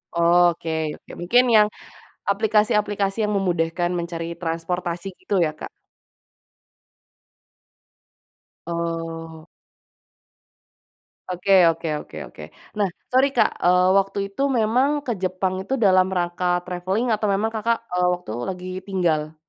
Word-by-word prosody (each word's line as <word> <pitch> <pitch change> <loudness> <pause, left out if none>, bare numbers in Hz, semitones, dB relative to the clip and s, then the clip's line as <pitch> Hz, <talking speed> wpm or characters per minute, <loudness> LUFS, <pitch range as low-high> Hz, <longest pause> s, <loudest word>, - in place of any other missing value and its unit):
Oke 170 0 +3 0.3
oke. - - -16
Mungkin 245 +8 +4
yang, 210 -1 +6 0.6
aplikasi-aplikasi 210 0 +1
yang 210 - 0
memudahkan 175 -3 0
mencari 170 -1 -4
transportasi 170 +1 -3
gitu, 200 -2 -1
ya 155 -2 +1
Kak? - - -8 3.0
Oh. 165 -1 -4 1.8
Oke 180 +2 -2 0.2
oke 165 0 -3
oke 80 - -11
oke. 75 - -12 0.4
Nah, 200 - +3 0.2
sorry 260 +2 +5
Kak, - - +4
eee, 180 +1 +4
waktu 195 +1 0
itu 270 - -5 0.2
memang 235 +5 +2 0.2
ke 245 - -1
Jepang 185 0 -1
itu, 260 - -4
dalam 185 -1 +5
rangka 175 +1 -2 0.2
travelling 185 +6 -2
atau 215 -1 +1
memang 220 +3 0
Kakak, 230 +2 +1
eee, 180 0 +2
waktu 180 -11 -6 0.2
lagi 180 -1 -6 0.2
tinggal? 160 -5 0
180 Hz, 115 wpm, -23 LUFS, 170-205 Hz, 3.0 s, yang